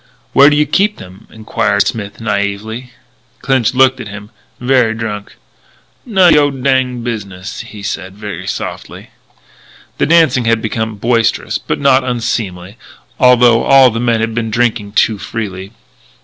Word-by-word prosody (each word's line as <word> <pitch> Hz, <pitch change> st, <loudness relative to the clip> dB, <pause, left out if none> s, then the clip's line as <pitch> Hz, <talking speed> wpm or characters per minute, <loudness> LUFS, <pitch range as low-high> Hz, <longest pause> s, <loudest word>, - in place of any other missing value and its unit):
"Where 140 Hz, +1 st, +7 dB
do 150 Hz, -, +1 dB
you 150 Hz, 0 st, +3 dB
keep 200 Hz, +8 st, +1 dB
them?" 95 Hz, +2 st, -13 dB
enquired 100 Hz, -2 st, -1 dB
Smith 105 Hz, -3 st, -4 dB
naïvely. 110 Hz, +3 st, -3 dB, 0.5 s
Clinch 130 Hz, -3 st, +1 dB
looked 130 Hz, 0 st, +4 dB
at 120 Hz, -, -7 dB
him, 105 Hz, +1 st, -10 dB, 0.3 s
very 125 Hz, -3 st, +2 dB
drunk: 105 Hz, -2 st, -6 dB, 0.7 s
"None 190 Hz, -6 st, +5 dB
o' -, -, +4 dB
your 145 Hz, -1 st, +3 dB
dinged 130 Hz, -2 st, -1 dB
business," 100 Hz, -5 st, -6 dB
he 105 Hz, -2 st, -10 dB
said 95 Hz, -1 st, -5 dB
very 100 Hz, -4 st, -7 dB
softly. -, -, -6 dB, 0.9 s
The -, -, +2 dB
dancing 155 Hz, -7 st, +3 dB
had 115 Hz, 0 st, +2 dB
become 110 Hz, 0 st, -3 dB
boisterous 115 Hz, +2 st, 0 dB
but -, -, -3 dB
not 135 Hz, -1 st, +3 dB
unseemly, 115 Hz, -6 st, -3 dB, 0.4 s
although 125 Hz, -2 st, +5 dB
all 135 Hz, -2 st, +6 dB
the 115 Hz, -, -3 dB
men 115 Hz, -2 st, +1 dB
had 115 Hz, 0 st, -2 dB
been 115 Hz, 0 st, -2 dB
drinking 110 Hz, -3 st, -1 dB
too 110 Hz, -1 st, +2 dB
freely. 100 Hz, -2 st, -6 dB
115 Hz, 150 wpm, -14 LUFS, 105-130 Hz, 0.9 s, Where